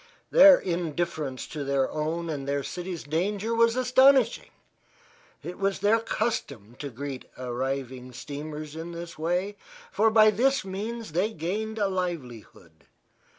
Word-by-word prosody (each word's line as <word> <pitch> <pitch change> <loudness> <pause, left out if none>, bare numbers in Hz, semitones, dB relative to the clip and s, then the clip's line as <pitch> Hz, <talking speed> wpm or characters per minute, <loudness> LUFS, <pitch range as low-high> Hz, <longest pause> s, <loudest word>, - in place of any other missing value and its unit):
Their 285 -1 +9
indifference 170 -5 -3
to 150 -2 -5
their 140 -1 +1
own 160 +2 -2
and 145 -4 -4
their 140 0 -1
city's 180 +1 -5
danger 200 +8 -1
was 230 0 +3
astonishing. 255 -1 +4 0.9
It 180 - -7
was 195 0 0
their 210 +3 +3
custom 140 - -3
to 145 - -5
greet 135 +1 -6
arriving 130 0 -4
steamers 150 +3 -7
in 165 +1 -6
this 170 -1 -8
way, 180 +5 -1 0.3
for 215 +4 +3
by 215 -1 +6
this 265 +3 +1
means 215 +3 -5
they 185 +7 0
gained 215 +5 -3
a 205 -2 +2
livelihood. 170 - -6
175 Hz, 135 wpm, -27 LUFS, 145-215 Hz, 0.9 s, Their